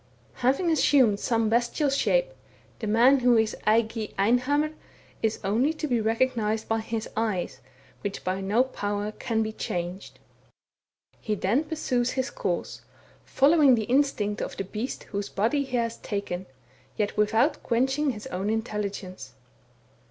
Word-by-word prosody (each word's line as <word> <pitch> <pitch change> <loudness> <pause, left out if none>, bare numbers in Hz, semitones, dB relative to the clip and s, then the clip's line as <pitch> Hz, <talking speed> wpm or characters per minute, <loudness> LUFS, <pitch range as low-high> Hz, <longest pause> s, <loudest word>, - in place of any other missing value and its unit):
Having 275 +8 +2
assumed 260 -9 +4
some 225 -1 +1
bestial 240 +6 +1
shape, - - +1 0.5
the 220 - -4
man 240 +6 +5
who 245 -1 +4
is 220 -1 +1
eigieinhammris 230 +6 +1 0.7
only 235 +10 +2
to 310 - -4
be 240 -4 +1
recognized 225 -1 0
by 225 0 +1
his 220 0 -4
eyes, 215 -5 -2 0.4
which 205 -1 -4
by 185 +1 -2
no 210 +6 +3
power 205 -5 -3
can 225 0 -1
be 220 - -3
changed. 180 -2 -5 1.0
He 215 - -2
then 220 +10 +1
pursues 255 -6 -1
his 260 0 -2
course, - - -3 0.4
follows 285 -2 +5
the 220 - -1
instincts 240 -5 +1
of - - -5
the - - -2
beast 215 +6 -5
whose 200 0 -4
body 235 +8 +1
he 260 -2 -2
has 230 -1 -1
taken, 195 -3 -4 0.5
yet 210 -2 -1
without 225 +8 +2
quenching 265 +5 +1
his 220 -3 -5
own 195 -6 -3
intelli 215 -2 -1
gence. 185 -10 -9
225 Hz, 140 wpm, -26 LUFS, 210-265 Hz, 1.0 s, man